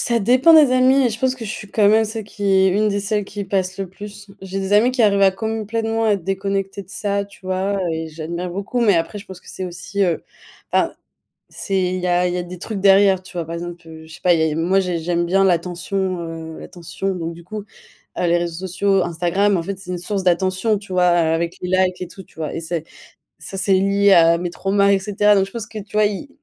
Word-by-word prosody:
ça 235 -1 +1
dépend 255 +9 +5
des 295 -5 +7
amis 260 +1 +4
et - - 0
je 220 - -5
pense 260 +1 +1
que 240 -3 -8
je 210 - -5
suis 210 -1 -7
quand 210 -2 +3
même 220 +1 +4
celle 220 -1 -5
qui 205 0 -8
est, 190 -1 +4
une 210 +3 +2
des 200 0 -1
celles 205 0 -1
qui 205 0 -6
passent 190 -1 -1
le 195 - -3
plus. 205 +2 -10
J'ai 195 0 -5
des 190 +1 -3
amis 225 +5 +5
qui 255 - +1
arrivent 200 -2 +3
à 195 -1 +6
complétement 225 +2 -2
à - - +3
être 190 -5 -2
déconnectés 195 0 -2
de 185 - -23
ça, 200 0 -2
tu 200 - -18
vois, 190 +2 -1
et 160 0 -3
j'admire 170 +3 -5
beaucoup. 200 +7 -3
Mais 210 -5 +4
après, 165 +5 -2
je 200 - -12
pense 190 -2 -10
que - - -19
c'est 190 - -5
aussi, 180 +3 -4
heu 170 -2 -1 0.5
enfin, - - +1 0.6
c'est, 195 -2 -2 0.2
il - - -3
y 180 - -4
a 180 0 +2
il 180 - -2
y - - -2
a 175 - -2
des 180 0 -9
trucs 210 -1 -5
derrière, 195 -1 +5
tu - - -13
vois. 165 - -2
Par 165 +1 -6
exemple, 175 0 -7
heu, 160 0 -11
je 160 - -14
sais 175 - -13
pas, 180 -1 +4 0.2
moi 180 +4 +2
j'ai 180 -3 -1
j'aime 170 +1 -1
bien 195 +3 +2
l'attention, 180 +1 -1
heu, 165 -1 -7
l'attention. 185 +2 -5
Donc, 165 -1 -4
du 170 +1 -13
coup, 210 +4 -6
heu, - - -16 0.6
les 170 0 +3
réseaux 175 +2 -4
sociaux, 195 +1 +1
Instagram, 175 +4 +1
en 165 - -2
fait, 195 +3 -5
c'est 190 - -12
une 180 - -2
source 195 +2 -3
d'attention, 190 +4 +1
tu 200 -1 -12
vois, 180 -1 +3
avec 170 0 +1
les 180 - -4
likes 185 -1 +1
et 180 - -4
tout, 190 - -12
tu - - -25
vois? 155 -2 -4
Et - - -3
c'est 165 -1 -3 0.6
ça, 195 - -8
c'est 190 +1 +2
lié 200 +1 +3
à 170 -1 +6
mes 175 0 -3
traumas, 200 +2 +1
et 195 - +3
cetera. 205 +1 +2
Donc, 195 -1 +3
je 195 - -13
pense 225 -1 -6
que, 220 -1 -7
tu 205 +1 -13
vois 215 0 +4
ils 210 +8 -3
195 Hz, 255 wpm, -20 LUFS, 175-205 Hz, 0.6 s, des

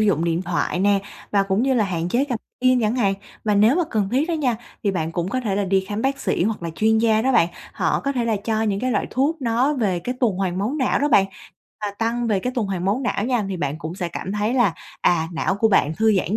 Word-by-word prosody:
dụng 185 -7 +2
điện 170 +1 0
thoại 180 - -1
nè, 200 0 +3 0.3
và 200 -1 +3
cũng 195 +3 0
như 265 0 +2
là 220 -4 +3
hạn 175 -2 -2
chế 250 +8 +2
gập 240 -4 -2 0.2
gym 255 -1 +4
chẳng 225 +2 +1
hạn. 200 -5 +2 0.3
Và 210 -1 +2
nếu 215 +7 +5
mà 355 - +3
cần 210 -4 0
thiết 285 +6 +1
á 340 - 0
nha, 260 -7 0 0.3
thì 200 - +3
bạn 165 -3 -2
cũng 175 +1 -2
có 255 +5 -1
thể 210 -6 -1
là 205 - +1
đi 190 0 +2
khám 210 +2 -3
bác 275 +1 0
sĩ - - 0
hoặc 210 -3 -2
là 165 - -3
chuyên 220 +3 +3
gia 220 -1 +3
đó 265 +1 +2
bạn, 170 - +4 0.2
họ - - 0
có 275 0 -1
thể 245 -3 -1
là 225 -2 +1
cho 220 -1 0
những 200 -2 0
cái 255 - 0
loại - - 0
thuốc 285 +6 +1
nó 250 +5 +2
về 200 -8 0
cái 245 +9 -4
tuần 215 -7 +2
hoàn 185 -2 -1
máu 215 +7 -1
não 260 - +2
đó 290 +1 +1
bạn 195 -7 +5 0.5
và 210 -1 -2
tăng 235 +1 0
về 210 -4 +2
cái 250 +6 -2
tuần 235 -4 0
hoàn 185 -2 -3
máu 205 +6 +1
não 215 -4 0
nha, 245 -4 0
thì 190 - -3
bạn 155 -3 -3
cũng 165 0 -6
sẽ 180 -2 -3
cảm 185 +3 -5
thấy 210 +3 0
là, 235 -10 +3 0.3
à, 165 -2 +2
não 180 +3 0
của 220 +3 +2
bạn 155 -7 +3
thư 220 0 +3
giãn 190 +3 0
215 Hz, 280 wpm, -22 LUFS, 190-245 Hz, 0.5 s, nếu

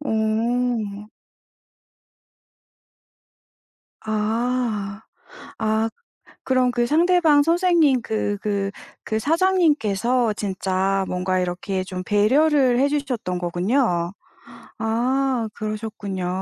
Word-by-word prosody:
오. 220 -3 -1 3.0
아. 220 -1 -1 0.6
아 220 0 +1 0.6
그럼 255 -1 +2
그 240 -1 0
상대방 320 -1 +4
선생님 330 -5 +3
그 215 -2 -2
그 200 -2 -1 0.3
그 220 - -2
사장님께서 265 - +2
진짜 195 -1 -1
뭔가 185 +1 -1
이렇게 180 +1 -2
좀 185 -1 -6
배려를 255 +5 +3
해 275 - +4
주셨던 265 -10 -2
거군요. 175 0 0 0.7
아 245 +2 0
그러셨군요. 215 -4 -4
220 Hz, 160 characters per minute, -22 LUFS, 200-265 Hz, 3.0 s, 상대방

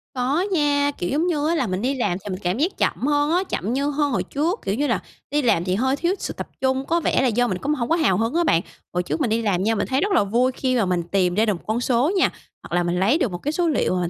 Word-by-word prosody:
Có 270 +8 +1
nha, 290 -4 +2
kiểu 175 - -2
giống 315 +5 +1
như 305 -3 0
á 340 - +1
là 260 -8 0
mình 185 +2 -2
đi 265 +3 0
làm 205 -8 0
thì 205 - -6
mình 185 - -4
cảm 180 +4 0
giác 335 +8 0
chậm 260 - 0
hơn 290 +1 +2
á, 360 +2 +2
chậm 220 +6 -2
như 280 +2 0
hơn 290 -1 0
hồi - - 0
trước, 330 +9 -1
kiểu 195 - 0
như 290 +4 0
là, 235 - +1 0.3
đi 295 0 +2
làm 225 -9 +2
thì 180 0 0
hơi 260 +6 +1
thiếu 345 +6 0
sự - - -4
tập - - -6
trung, 265 0 +1
có 340 +1 +1
vẻ 315 - +1
là 265 - +3
do 245 +1 +2
mình 185 - -2
cũng 290 +10 -1
hổng 240 -5 -2
có 330 - +4
hào 285 - +2
hứng 225 +2 0
á 345 - +3
bạn. 170 - +3 0.3
Hồi 180 0 0
trước 315 - -3
mình 245 - +1
đi 225 +1 +1
làm 190 -4 0
nha, 225 +2 +1
mình - - -1
thấy 265 +2 0
rất 405 +2 0
là 355 - +4
vui 240 +6 +1
khi 255 0 -1
mà 220 - +2
mình 180 -2 0
tìm 180 0 0
ra 220 - +3
được 210 - +1
1 170 - -9
con 225 +3 0
số 255 +7 +2
nha, - - +4 0.3
hoặc - - -5
là 175 - +2
mình 175 +1 -1
lấy 225 +11 +3
được 250 - 0
1 175 - -4
cái 290 - -3
số 345 +2 0
liệu 280 - +1
mà 180 - 0
mình 175 - -1
255 Hz, 330 wpm, -22 LUFS, 195-295 Hz, 0.3 s, có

